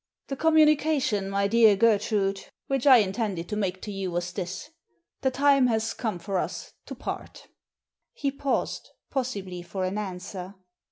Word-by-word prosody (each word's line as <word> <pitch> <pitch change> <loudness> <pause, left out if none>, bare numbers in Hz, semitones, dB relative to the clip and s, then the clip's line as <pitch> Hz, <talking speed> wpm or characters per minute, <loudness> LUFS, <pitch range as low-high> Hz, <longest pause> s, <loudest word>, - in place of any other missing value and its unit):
"The 275 - -2
communication, 305 -9 +3
my 200 0 +1
dear 220 -1 +6
Gertrude, 205 -2 +1 0.2
which 270 0 -1
I 260 -2 +10
intended 195 -4 -1
to 210 - -2
make 190 -3 -2
to 210 - -5
you 195 -2 -3
was 175 0 -3
this. 185 - -5 0.5
The 265 - +2
time 275 0 +4
has 225 -1 0
come 220 -7 -3
for 190 +2 -2
us - - -5
to - - -6
part" - - -7 0.6
He 280 -2 -2
paused, 275 0 -2 0.2
possibly 200 -9 -3
for 185 +2 -4
an 190 +3 -2
answer. 185 -1 -6
210 Hz, 155 wpm, -26 LUFS, 190-260 Hz, 0.6 s, I